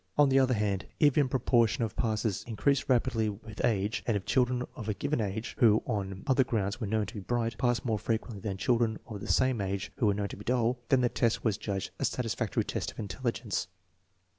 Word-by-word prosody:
On 145 Hz, -1 st, +6 dB
the 135 Hz, 0 st, +5 dB
other 130 Hz, -2 st, +3 dB
hand, 100 Hz, -2 st, -1 dB
if 145 Hz, -3 st, +5 dB
the 150 Hz, -, +4 dB
proportion 120 Hz, -2 st, +2 dB
of 110 Hz, -1 st, -3 dB
passes 110 Hz, -3 st, -1 dB
increased 135 Hz, +6 st, +1 dB
rapidly 120 Hz, -3 st, +2 dB
with 110 Hz, +1 st, -7 dB
age, 105 Hz, -1 st, +1 dB
and 115 Hz, -3 st, +2 dB
if 95 Hz, -, -7 dB
children 125 Hz, -1 st, +2 dB
of 110 Hz, -3 st, -5 dB
a 105 Hz, -, 0 dB
given 145 Hz, 0 st, -1 dB
age, 110 Hz, +2 st, -3 dB
who 110 Hz, -2 st, +5 dB
on 95 Hz, -2 st, -3 dB
other 130 Hz, -1 st, +4 dB
grounds 110 Hz, -3 st, -2 dB
were 110 Hz, -, -1 dB
known 110 Hz, +1 st, +1 dB
to -, -, -9 dB
be 105 Hz, -, -5 dB
bright, 115 Hz, +3 st, -1 dB
passed 120 Hz, -2 st, +1 dB
more 110 Hz, -3 st, 0 dB
frequently 110 Hz, -1 st, -3 dB
than 95 Hz, -2 st, -3 dB
children 115 Hz, 0 st, +1 dB
of 105 Hz, -3 st, -7 dB
the -, -, -6 dB
same 130 Hz, -4 st, +2 dB
age 100 Hz, +1 st, -3 dB
who 115 Hz, -, +2 dB
were 100 Hz, -, +3 dB
known 100 Hz, 0 st, -2 dB
to -, -, -8 dB
be 105 Hz, -, -9 dB
dull, 120 Hz, +1 st, +1 dB
then 130 Hz, -2 st, +4 dB
the 120 Hz, -, +3 dB
test 115 Hz, -1 st, 0 dB
was 110 Hz, -3 st, +1 dB
judged 100 Hz, -2 st, -3 dB
a -, -, +1 dB
satisfactory 115 Hz, -3 st, -1 dB
test -, -, -3 dB
of -, -, -21 dB
intelligence. 115 Hz, 0 st, -2 dB
115 Hz, 225 wpm, -30 LUFS, 105-125 Hz, -, On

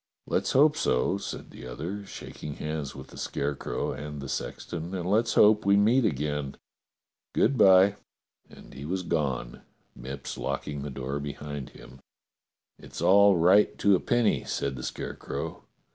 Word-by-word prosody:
" -, -, -61 dB
"Let's -, -, 0 dB
hope 150 Hz, +3 st, +5 dB
so," 65 Hz, +10 st, +1 dB
said -, -, -7 dB
the 60 Hz, -, -10 dB
other, 90 Hz, +11 st, -6 dB
shaking 75 Hz, -1 st, -8 dB
hands 75 Hz, -2 st, -4 dB
with -, -, -10 dB
the -, -, -13 dB
Scarecrow 70 Hz, 0 st, -2 dB
and 75 Hz, 0 st, -6 dB
the 70 Hz, -, -6 dB
sexton, 85 Hz, +6 st, -5 dB
"and 90 Hz, -1 st, -3 dB
let's 115 Hz, +4 st, +2 dB
hope 105 Hz, 0 st, +6 dB
we 100 Hz, 0 st, +4 dB
meet 115 Hz, +5 st, +4 dB
again. 75 Hz, -4 st, -2 dB, 0.8 s
Good 135 Hz, +6 st, +3 dB
bye." 95 Hz, -2 st, +6 dB, 0.5 s
And -, -, -15 dB
he 70 Hz, -, -8 dB
was 90 Hz, +5 st, -2 dB
gone, 70 Hz, -8 st, -2 dB, 0.3 s
IViipps 65 Hz, +2 st, -7 dB
locking 70 Hz, +1 st, -3 dB
the 70 Hz, -, -5 dB
door 70 Hz, +1 st, -4 dB
behind 70 Hz, -1 st, -6 dB
him. 65 Hz, +1 st, -14 dB, 0.4 s
" -, -, -53 dB
It's -, -, -9 dB
all 100 Hz, 0 st, +6 dB
right 90 Hz, +5 st, +4 dB
to 100 Hz, -1 st, +4 dB
a -, -, +1 dB
penny," 120 Hz, -2 st, +1 dB
said 70 Hz, -1 st, -2 dB
the 65 Hz, -, -7 dB
Scarecrow. -, -, -5 dB
80 Hz, 160 wpm, -27 LUFS, 70-100 Hz, 0.8 s, hope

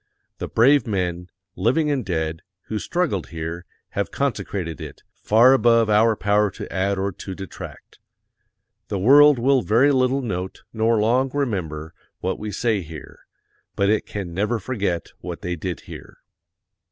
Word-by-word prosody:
The -, -, -3 dB
brave 135 Hz, +4 st, +4 dB
men, 90 Hz, -3 st, -2 dB, 0.3 s
living 150 Hz, +6 st, +1 dB
and 135 Hz, -3 st, 0 dB
dead, 80 Hz, -4 st, -2 dB, 0.2 s
who 110 Hz, -, -4 dB
struggled 155 Hz, -, -1 dB
here, 85 Hz, +1 st, -6 dB, 0.2 s
have 100 Hz, -, -2 dB
consecrated 100 Hz, -, -3 dB
it, -, -, -9 dB
far 120 Hz, +5 st, +5 dB
above 115 Hz, -4 st, +4 dB
our 110 Hz, +2 st, +4 dB
power 105 Hz, 0 st, +2 dB
to -, -, -9 dB
add 100 Hz, +1 st, 0 dB
or 100 Hz, +1 st, -1 dB
to 95 Hz, +1 st, -8 dB
detract. 95 Hz, -1 st, -10 dB, 0.9 s
The 100 Hz, -, -2 dB
world 145 Hz, +8 st, +7 dB
will 130 Hz, +2 st, +3 dB
very 120 Hz, +7 st, +4 dB
little 130 Hz, 0 st, +2 dB
note 95 Hz, -5 st, -4 dB
nor 110 Hz, 0 st, +2 dB
long 125 Hz, +5 st, +2 dB
remember 85 Hz, -, -3 dB, 0.3 s
what 95 Hz, +1 st, -2 dB
we 105 Hz, 0 st, -5 dB
say 110 Hz, 0 st, 0 dB
here; 80 Hz, -3 st, -11 dB, 0.5 s
but 100 Hz, 0 st, +2 dB
it 110 Hz, -, 0 dB
can 95 Hz, -4 st, -5 dB
never 105 Hz, +6 st, 0 dB
forget 100 Hz, -6 st, -2 dB
what 90 Hz, -2 st, -7 dB
they 90 Hz, -2 st, -2 dB
did 85 Hz, +1 st, -5 dB
here. -, -, -11 dB
105 Hz, 155 wpm, -22 LUFS, 90-120 Hz, 0.9 s, world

